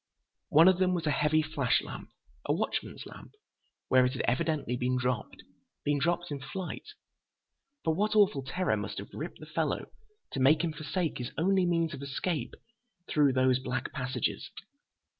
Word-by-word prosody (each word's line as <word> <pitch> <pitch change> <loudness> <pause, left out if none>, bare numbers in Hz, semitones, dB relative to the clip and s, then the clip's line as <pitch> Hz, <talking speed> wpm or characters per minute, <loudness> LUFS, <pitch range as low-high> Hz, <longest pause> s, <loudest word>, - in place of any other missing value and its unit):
One 160 +4 +7
of 185 -1 +5
them 185 -1 +3
was 170 - -2
a 150 - +2
heavy 150 +2 +3
flash 150 -6 +1
lamp—a - - -8
watchman's - - -3
lamp—where 130 0 -2
it 125 0 +1
had 130 - -2
evidently 130 0 0
been 125 +1 0
dropped. 125 -2 -2 0.4
Been 145 0 +2
dropped 175 +2 0
in 145 - -3
flight! 175 - -6 1.0
But 160 - +2
what 210 +6 0
awful 200 -10 +4
terror 180 +8 0
must - - -5
have - - -7
gripped - - -6
the - - -9
fellow - - -2 0.4
to - - -3
make 150 +5 +5
him 165 -2 -1
forsake 160 +1 -2
his 125 +1 -3
only 185 +2 +3
means 165 -2 +1
of 140 - -7
escape 145 +4 -3 0.5
through 145 -3 +3
those 130 0 +3
black 130 -1 -3
passages? 130 -3 -2
150 Hz, 160 wpm, -30 LUFS, 130-170 Hz, 1.0 s, One